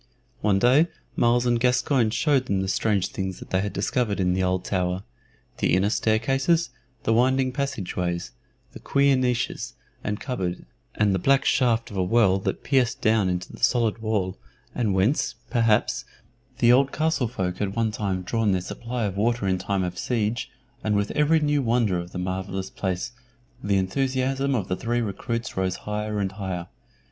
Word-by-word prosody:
One 105 -2 +3
day 130 +10 +5 0.3
Myles 120 +1 +3
and 120 -1 +2
Gascoyne 125 -1 +2
showed 130 +3 +1
them 95 -1 +1
the 95 - -2
strange 100 0 +1
things 95 -1 -4
that - - -12
they 95 - +2
had 100 0 -2
discovered 105 +1 -1
in 90 -1 +2
the 95 - 0
old 90 0 0
tower 90 0 -1 0.6
the - - +3
inner 100 +3 +2
staircases, 135 +10 +1 0.3
the 115 - +2
winding 130 +2 +3
passage 135 -9 -3
ways, 85 -1 -2 0.4
the - - -10
queer 140 0 +3
niches 125 -1 -1 0.3
and 105 0 -2
cupboard, 95 -10 -3 0.3
and 105 -2 +2
the 95 - +1
black 135 +8 +3
shaft 120 -5 +2
of 100 - -6
a 95 - +2
well 95 -1 +3
that - - -3
pierced 130 -3 +1
down 110 -4 +2
into 90 0 -3
the - - -11
solid 115 -3 +2
wall, 105 -4 -1 0.3
and 110 -6 0
whence, 105 +10 +1 0.2
perhaps, 110 - +2 0.5
the 120 - +5
old 135 +2 +4
castle 155 -5 0
folk 90 -6 -3
had 100 -1 -2
one 115 -2 +1
time 95 -4 -2
drawn 110 +1 +1
their 90 - 0
supply 120 +6 -4
of 100 -2 -2
water 115 0 +1
in 95 -1 +1
time 95 0 -1
of 90 0 -4
siege, 115 -1 -1 0.3
and 110 -1 +1
with 100 0 0
every 150 +2 +3
new 145 -1 +1
wonder 115 -7 +1
of 85 0 -7
the - - -6
marvellous 95 +1 -3
place 95 +2 -3 0.5
the 100 -1 +2
enthusiasm 135 +6 0
of 100 -6 -1
the 90 - -1
three 120 +5 -1
recruits 115 +2 -3
rose 95 -1 0
higher 105 +1 -3
and 95 -2 -1
higher. 95 -3 -4
110 Hz, 180 wpm, -25 LUFS, 95-125 Hz, 0.6 s, day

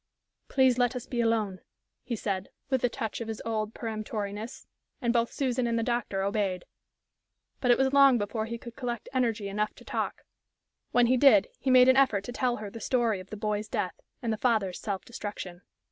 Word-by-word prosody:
"Please 260 -2 +3
let 245 0 +2
us 245 - -4
be 240 -2 -1
alone," 220 -5 0 0.4
he 240 - -3
said, 195 -3 -3 0.2
with 260 -2 +1
a 245 - +4
touch 225 0 -4
of 230 - -4
his 220 -1 -4
old 220 -1 -2
peremptoriness, 215 0 -5 0.3
and 235 -4 +1
both 235 -1 +2
Susan 255 -3 0
and 230 0 0
the 230 - +1
doctor 235 -5 -1
obeyed. 195 -3 -1 0.9
But 250 - 0
it 245 - +6
was 265 0 +2
long 275 -2 +7
before 220 +1 -2
he 235 +1 -4
could 235 0 -10
collect 240 -3 -4
energy 230 -5 0
enough 210 +2 -2
to - - -15
talk. - - -3 0.7
When 245 -1 +4
he 255 +2 +3
did, 240 -7 +6
he 265 - -1
made 255 0 +7
an 260 0 +6
effort 225 -8 +4
to 245 - -6
tell 245 -1 0
her 210 -3 -7
the 230 - -8
story 235 -6 +1
of 185 +1 -11
the 215 - -6
boy's 210 0 -2
death, 185 - -3 0.2
and 225 -2 0
the - - -3
father's 215 -6 +1
self 200 -3 -4
destruction. 205 -6 -6
230 Hz, 205 wpm, -29 LUFS, 210-245 Hz, 0.9 s, long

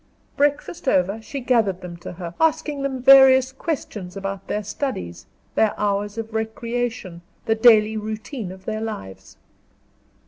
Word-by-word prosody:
Breakfast 290 +2 -1
over, 195 0 +1
she 275 +5 -6
gathered 225 -7 +1
them 180 -1 -8
to 175 - -8
her, 175 -1 -7
asking 315 -2 +1
them 265 -2 -3
various 265 -1 +7
questions 215 - -5
about 195 0 -5
their 210 - -2
studies, 90 - -5 0.3
their 220 -1 +1
hours 205 +1 -1
of 225 -1 -5
recreation, 225 -4 -3 0.2
the 225 - +2
daily 220 -1 +5
routine 215 0 -5
of 190 0 -13
their 215 0 -3
lives. 95 - -7
220 Hz, 140 wpm, -22 LUFS, 195-260 Hz, 0.3 s, various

